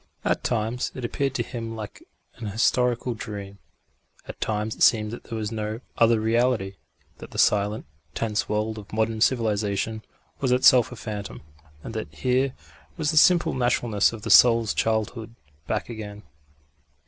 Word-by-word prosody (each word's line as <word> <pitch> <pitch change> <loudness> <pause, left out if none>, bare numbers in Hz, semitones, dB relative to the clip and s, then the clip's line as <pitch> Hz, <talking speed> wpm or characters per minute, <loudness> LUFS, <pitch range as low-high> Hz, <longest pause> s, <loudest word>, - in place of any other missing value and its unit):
At - - 0
times 115 +1 -1
it 130 - -4
appeared 135 +2 -2
to - - 0
him 115 -2 -6
like 110 -2 -8 0.4
an 115 - -6
historical 120 +3 +1
dream; 100 -3 -8 0.7
at - - -9
times 110 0 -1
it - - -13
seemed 105 -2 +4
that 120 - -8
there 115 - -5
was 105 0 -3
no 110 0 -4 0.2
other 115 -1 +4
reality; 110 -3 +1 0.4
that - - -10
the - - -10
silent, 105 +1 +2 0.3
tense 110 -2 -1
world 105 +1 -1
of 100 - -13
modern 110 0 -1
civilisation 110 -2 0 0.4
was 130 -2 0
itself 125 -1 +5
a - - -7
phantom, 105 -6 -7 0.4
and 115 - -7
that 110 -9 -5
here 130 - 0 0.4
was 155 -2 0
the - - -4
simple 175 +2 +5
naturalness 120 -4 +1
of 110 -3 -9
the - - -2
soul's 115 -3 +6
childhood 110 +1 -1 0.3
back - - -2
again. 105 -3 -8
110 Hz, 160 wpm, -25 LUFS, 105-120 Hz, 0.7 s, soul's